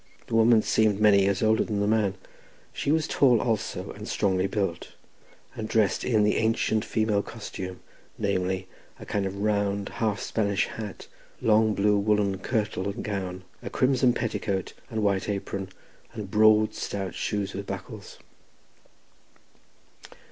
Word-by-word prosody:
The - - -9
woman 115 0 +5
seemed 110 -2 +2
many 105 -2 +6
years 95 +1 +1
older 110 0 +3
than 105 -2 -2
the 100 - +1
man; 105 -2 +2 0.6
she 140 - -1
was 160 0 +2
tall 125 -5 +4
also, 110 -2 -2
and - - -9
strongly 95 -2 +1
built, 95 -5 -3 0.6
and 110 - -5
dressed 110 -3 +2
in 110 -4 +2
the 105 - +2
ancient 110 -1 +1
Welsh - - -15
female 110 -2 +2
costume, 95 -4 -7 0.4
namely, 95 -2 -1 0.3
a - - -9
kind 100 -2 -1
of 95 +1 -6
round 100 -1 0
half 110 -3 -1
Spanish 100 -3 0
hat, 105 -3 -7 0.3
long 110 -1 +3
blue 105 +1 +3
woollen 100 -2 +1
kirtle, 105 -3 -1
or 100 - -2
gown, 95 -3 -4 0.2
a - - -6
crimson 130 -1 +3
petticoat, 105 -5 -2 0.2
and 110 -1 -2
white 100 0 +1
apron, 100 -1 -3 0.4
and 105 -4 -7
broad, 110 0 +5
stout 95 -2 -4
shoes 105 -2 -2
with 100 +1 -6
buckles. - - -7
105 Hz, 150 wpm, -26 LUFS, 100-110 Hz, 0.6 s, many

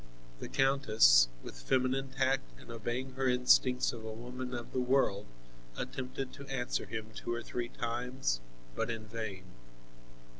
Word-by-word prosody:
The - - -6
countess, 110 - +5 0.2
with - - -9
feminine 130 - +1
tact 130 - 0
and - - -11
obeying 120 +3 -3
her 135 0 0
instincts 125 0 +4
of 115 -2 -8
a 110 - -5
woman 125 +3 -6
of 120 -1 -6
the 130 - +1
world, 125 -6 +2 0.5
attempted 130 0 -4
to 140 - -10
answer 130 -3 -2
him 110 0 -5
two - - -5
or 120 0 -2
three 120 -1 -3
times, 120 - -2 0.4
but - - -1
in 115 -1 -4
vain. 110 -4 -5
125 Hz, 150 wpm, -33 LUFS, 110-130 Hz, 0.5 s, countess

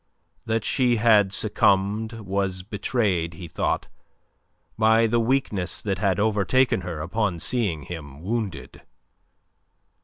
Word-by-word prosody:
That 110 0 0
she 125 -2 +2
had 105 -4 +4
succumbed 105 +2 +1
was 95 -3 -3
betrayed, 100 -5 -1
he 85 +1 -8
thought, 75 - -2 0.9
by 110 +1 +4
the 120 +1 +2
weakness 115 -6 0
that 100 -3 -3
had 100 -1 +1
overtaken 105 +2 +2
her 85 -3 -5
upon 90 +1 -1
seeing 95 - -1
him 75 -2 -9
wounded. 105 -3 -4
100 Hz, 115 wpm, -24 LUFS, 90-110 Hz, 0.9 s, had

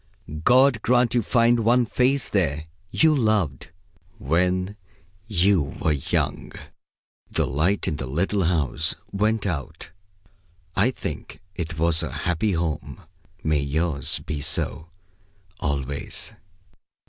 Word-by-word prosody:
God 125 0 +5
grant 120 0 +3
you 120 - +3
find 120 +2 +3
one 120 +2 +3
face 130 +5 +1
there, 80 -6 0 0.2
You 160 -1 +4
loved 110 - 0 0.5
when 90 +6 0 0.5
you 100 -3 +3 0.2
were 80 - +1
young." 70 -3 -2 0.8
The - - 0
light 80 +10 0
in 75 - -1
the 65 - -5
little 95 +7 0
house 80 -2 +1 0.2
went 105 +2 0
out. 75 -9 -4 0.8
I 105 +6 +3
think 130 - -6
it 85 -2 -5
was 80 0 +3
a 80 -5 -4
happy 90 - -1
home. 80 -3 -3 0.4
May 75 -1 +2
yours 70 +1 0
be 75 -2 -3
so, 75 +2 -1 0.7
always. 70 -1 -2
90 Hz, 115 wpm, -24 LUFS, 75-110 Hz, 0.8 s, God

